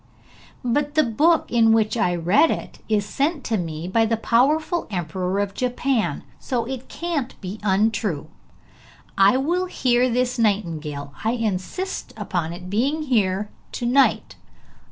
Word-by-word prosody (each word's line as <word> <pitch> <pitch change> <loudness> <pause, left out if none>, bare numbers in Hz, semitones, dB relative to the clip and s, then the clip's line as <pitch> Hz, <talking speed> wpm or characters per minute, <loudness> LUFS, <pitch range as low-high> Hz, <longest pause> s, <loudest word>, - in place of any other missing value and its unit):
'But 290 +4 0
the 310 - +5
book 300 +8 +2
in 225 -2 +5
which 220 0 +2
I 180 -6 +1
read 180 - +4
it - - -4
is 210 -2 +2
sent 285 +5 -1
to 225 - 0
me 165 -2 -4
by 225 +4 +2
the 225 0 +1
powerful 300 - +2
Emperor 180 0 -2
of 200 -1 -1
Japan, 250 -1 -1 0.2
so 240 -4 -2
it 260 0 -6
can't 315 -7 -3
be 195 +3 -6
untrue. 200 -5 +1 0.9
I 195 +5 +5
will 345 +7 0
hear 250 -6 +2
this 250 +1 0
nightingale; 160 -10 -1
I 225 +2 +1
insist 230 - -3
upon 165 -3 -2
its 175 +1 -8
being 265 +11 0
here 210 -7 +1 0.2
to 240 - -3
night. 265 +3 +2
225 Hz, 145 wpm, -23 LUFS, 190-265 Hz, 0.9 s, the